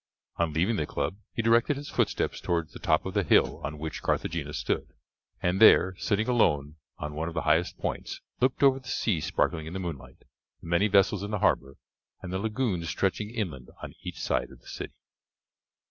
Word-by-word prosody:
On 85 -2 +1
leaving 90 +9 +1
the 75 - -1
club 95 - -2
he 115 - -2
directed 115 +5 +3
his 145 +1 -7
footsteps - - 0
towards 85 -3 -1
the - - -9
top 80 - +2
of 95 - -4
the 100 - +2
hill - - +3
on 75 +2 -4
which 80 +1 -5
Carthagena 75 -3 -1
stood, - - -2 0.5
and 90 +3 +1
there, 95 -4 +7
sitting 110 +1 0
alone 75 - +2 0.2
on 75 0 -5
one 80 +2 -3
of 85 - -6
the - - -1
highest 80 +3 +2
points, - - -4 0.2
looked 130 +3 +1
over 135 -1 +5
the 130 - -16
sea 100 -10 0
sparkling 80 +1 0
in 80 - -7
the 95 - -3
moonlight, 70 -8 -7 0.4
the - - -12
many 85 +5 +3
vessels 100 -1 +3
in 100 - -4
the 105 - -1
harbour 70 -7 +1 0.4
and 90 -1 -7
the 95 - 0
lagoons 105 -6 -1
stretching 100 +2 -1
inland 90 - -4
on - - -7
each - - -7
side - - 0
of - - -15
the - - -20
city. - - -7
90 Hz, 200 wpm, -28 LUFS, 80-110 Hz, 0.5 s, there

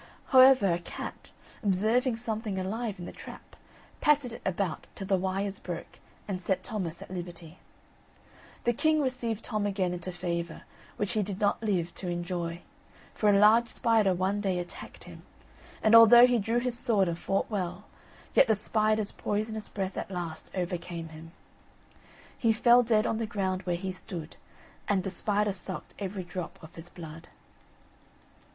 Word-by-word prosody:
However 260 - +7
a 170 - -1
cat, 170 - -8 0.3
observing 220 +5 +2
something 220 -3 -3
alive 210 +3 -3
in 175 - -7
the - - -7
trap, - - -12 0.4
patted 290 -5 +3
it - - -9
about 190 -3 -2
till 195 - -6
the 195 0 +2
wires 195 +2 -2
broke, 170 -2 -7 0.3
and 190 -3 -3
set 185 0 -1
Thomas 180 -6 -4
at - - -14
liberty. 175 -2 -8 1.0
The 240 - +2
king 310 +5 +2
received 245 -5 -2
Tom 215 -3 -1
again 190 -3 0
into 180 +1 -5
favour, 170 -2 -4 0.3
which 205 - -1
he 215 - +1
did 195 -1 -4
not 205 0 +1
live 185 -6 0
to 185 - -7
enjoy, 175 -1 -3 0.5
for 210 - +2
a 200 - +5
large 220 +3 +6
spider 220 -6 +2
one 190 +3 0
day 190 -3 0
attacked 175 0 -8
him; - - -12 0.6
and 220 - +4
although 230 +1 +10
he 245 -1 +2
drew 225 +3 0
his 240 -1 -1
sword 205 -6 +2
and 170 0 -3
fought 195 +3 -1
well, 185 -1 -3 0.5
yet 270 - +6
the 220 - +4
spider's 215 0 +1
poisonous 215 +1 -3
breath 195 -1 -4
at - - -5
last 175 -4 -5
overcame 175 -2 -4
him. 160 +1 -11 1.0
He 230 -2 +2
fell 240 +2 +6
dead 220 -2 +2
on 225 - 0
the 225 - -2
ground 190 -4 -1
where 175 - +1
he 190 +2 -3
stood, 180 -3 -8 0.5
And 195 -3 +1
the 195 - -3
spider 210 +1 +1
suck'd 190 -2 -7
every 195 -1 -4
drop 180 -1 -6
of 160 - -12
his 165 +1 -10
blood. 165 0 -10
195 Hz, 165 wpm, -29 LUFS, 180-220 Hz, 1.0 s, although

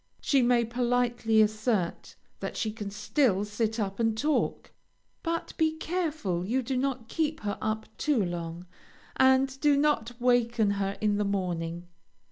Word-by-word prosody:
She 275 -2 +2
may 240 -1 +3
politely 240 -2 +2
assert 215 -4 -1 0.2
that - - -5
she 220 - -1
can 210 -2 -6
still 210 0 +1
sit 220 +2 -2
up 195 -1 -2
and 225 -1 +1
talk, 300 +6 0 0.5
but 335 0 -3
be 315 -1 +2
careful 315 - -2
you 250 +7 0
do 260 +2 -2
not 260 -2 -1
keep 310 +1 -1
her 205 -1 -3
up 220 0 -2
too 275 -10 +2
long; 170 0 -5 0.5
and 265 0 +4
do 290 -1 +4
not 250 -5 +1
waken 240 -3 +2
her 200 0 -2
in 210 -1 +2
the 210 - +1
morning. 175 -3 -2
230 Hz, 150 wpm, -28 LUFS, 205-265 Hz, 0.5 s, and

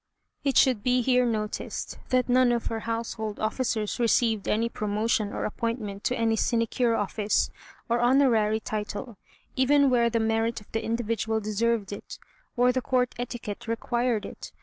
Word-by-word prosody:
It 275 -3 +1
should 255 -6 +4
be 250 +2 +2
here 250 0 +3
noticed 215 -2 -3
that 255 -1 +2
none 250 0 +4
of 235 -1 -1
her 225 - -2
household 225 -2 -3
officers 220 0 -1
received 230 -3 +2
any 225 +2 +1
promotion 215 -1 -1
or - - -3
appointment 215 -2 -3
to 250 - +1
any 225 -1 +2
sinecure 230 +1 +1
office, 205 0 0 0.4
or 235 +1 +1
honorary 240 -4 +3
title, 215 +1 -5 0.4
even 275 +1 +4
where 235 -1 +3
the 230 0 0
merit 225 +1 0
of 210 - -20
the 225 0 -2
individual 225 -1 -1
deserved 215 0 0
it, 200 - -8 0.4
or 250 +1 +5
the 255 +1 -1
Court 250 -1 +1
etiquette 240 -3 -5
required 235 -1 -1
it. - - -9
230 Hz, 155 wpm, -27 LUFS, 215-245 Hz, 0.4 s, or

